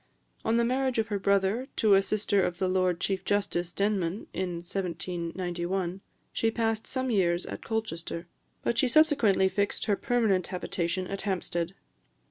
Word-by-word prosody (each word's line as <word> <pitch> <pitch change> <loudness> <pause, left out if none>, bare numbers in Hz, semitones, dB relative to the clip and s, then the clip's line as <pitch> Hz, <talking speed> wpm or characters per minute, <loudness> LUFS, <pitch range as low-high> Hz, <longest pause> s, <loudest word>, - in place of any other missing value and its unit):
On 225 +1 +2
the 235 - +3
marriage 260 +1 +1
of 220 -1 +1
her 205 -2 -1
brother 200 +5 +2
to 215 -2 +4
a 195 - +7
sister 205 0 +1
of 175 -1 -1
the 185 - 0
Lord 185 -2 +1
Chief 190 0 -1
Justice 190 -4 0
Denman, 200 -1 0
in 185 -2 -2
1791, 175 +1 -3 0.3
she 225 - +2
passed 225 -1 -1
some 260 -1 -1
years 175 -4 +2
at - - -6
Colchester; 170 -6 -3 0.4
but 235 - +1
she 260 - +4
subsequently 245 -9 +4
fixed 200 +1 -1
her 210 -2 +2
permanent 210 -6 +1
habitation 180 0 -2
at 195 +2 -4
Hampstead. 180 -2 -2
195 Hz, 155 wpm, -28 LUFS, 180-220 Hz, 0.4 s, a